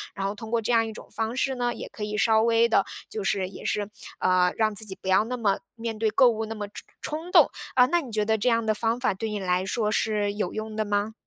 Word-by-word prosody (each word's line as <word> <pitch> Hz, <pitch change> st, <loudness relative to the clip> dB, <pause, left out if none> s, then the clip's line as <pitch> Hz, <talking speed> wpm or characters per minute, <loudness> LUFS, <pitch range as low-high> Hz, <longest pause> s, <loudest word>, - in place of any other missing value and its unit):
然 195 Hz, -, -3 dB
后 200 Hz, -, -2 dB
通 220 Hz, +1 st, -8 dB
过 235 Hz, -1 st, +2 dB
这 225 Hz, -, -1 dB
样 225 Hz, -1 st, +3 dB
一 -, -, -5 dB
种 215 Hz, -, -11 dB
方 225 Hz, +1 st, -2 dB
式 265 Hz, 0 st, 0 dB
呢， 245 Hz, -1 st, 0 dB
也 -, -, -7 dB
可 210 Hz, -, -7 dB
以 210 Hz, 0 st, -3 dB
稍 220 Hz, 0 st, +4 dB
微 230 Hz, 0 st, +4 dB
的 200 Hz, -3 st, +3 dB, 0.2 s
就 215 Hz, -, -4 dB
是 195 Hz, -1 st, 0 dB
也 -, -, -11 dB
是， 205 Hz, -1 st, -1 dB, 0.3 s
呃， 180 Hz, -1 st, +3 dB
让 220 Hz, -1 st, +2 dB
自 220 Hz, -, -5 dB
己 190 Hz, -2 st, -8 dB
不 -, -, -8 dB
要 190 Hz, +2 st, +4 dB
那 250 Hz, +2 st, -3 dB
么 205 Hz, -5 st, +1 dB, 0.2 s
面 225 Hz, -1 st, -4 dB
对 220 Hz, 0 st, +2 dB
购 245 Hz, +4 st, +5 dB
物 225 Hz, -1 st, -2 dB
那 225 Hz, +1 st, -6 dB
么 205 Hz, -1 st, -5 dB
冲 205 Hz, -, -10 dB, 0.2 s
冲 320 Hz, +4 st, -5 dB
动。 -, -, +7 dB, 0.3 s
呃， 250 Hz, -1 st, +7 dB
那 345 Hz, +5 st, +2 dB
你 260 Hz, -6 st, -9 dB
觉 210 Hz, -1 st, 0 dB
得 220 Hz, +1 st, +2 dB
这 220 Hz, +4 st, +1 dB
样 230 Hz, -1 st, +2 dB
的 215 Hz, -, +2 dB
方 225 Hz, +2 st, 0 dB
法， 250 Hz, -, +1 dB
对 220 Hz, +4 st, -4 dB
你 210 Hz, -1 st, -3 dB
来 180 Hz, -1 st, 0 dB
说 210 Hz, +2 st, 0 dB
是 210 Hz, -2 st, +1 dB
有 205 Hz, -3 st, -2 dB
用 215 Hz, 0 st, -5 dB
的 215 Hz, -, 0 dB
吗？ 205 Hz, +1 st, -1 dB
220 Hz, 305 characters per minute, -26 LUFS, 205-230 Hz, 0.3 s, 动